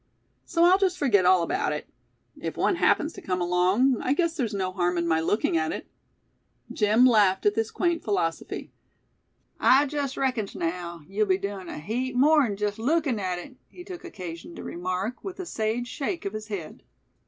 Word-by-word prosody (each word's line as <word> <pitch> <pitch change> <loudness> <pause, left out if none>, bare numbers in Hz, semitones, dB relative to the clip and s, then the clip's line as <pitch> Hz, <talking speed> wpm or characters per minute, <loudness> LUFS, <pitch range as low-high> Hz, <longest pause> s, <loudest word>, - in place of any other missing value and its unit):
So 335 - +1
I'll 365 +2 +6
just 375 -2 +1
forget 205 -10 +3
all 185 -2 +5
about - - -1
it. - - -5 0.5
If - - -6
one 370 - +2
happens 320 -2 +2
to - - -10
come 180 -1 -2
along, 185 +9 +2
I 260 - +1
guess 335 +1 0
there's 245 -9 -1
no 185 -2 -1
harm 180 -1 0
in 170 0 0
my 160 -1 +2
looking 165 +1 +1
at 160 0 0
it." - - -5 0.9
Jim 215 +3 +4
laughed 205 -6 +4
at 205 - +4
this 225 0 -1
quaint 345 -2 0
philosophy. 175 -6 -2 0.9
"I 270 +3 +5
jest 285 -2 -3
reckons 250 -7 -1
naow, 170 0 -4
yeou'll 205 +3 0
be 185 -1 +3
doin' 195 -2 -5
a - - -6
heap 245 +10 -3
more'n 270 -5 +4
jest 205 0 -2
lookin' 275 -1 +1
at 185 -2 -2
hit," 255 +9 -10
he 355 - -12
took 360 -2 -9
occasion 175 - -8
to - - -8
remark, 185 +6 -4
with 385 -1 -7
a 370 - -4
sage 230 -3 -2
shake 320 +7 -4
of 200 - -3
his 215 0 -6
head. 190 -8 -6
215 Hz, 190 wpm, -26 LUFS, 185-275 Hz, 0.9 s, I'll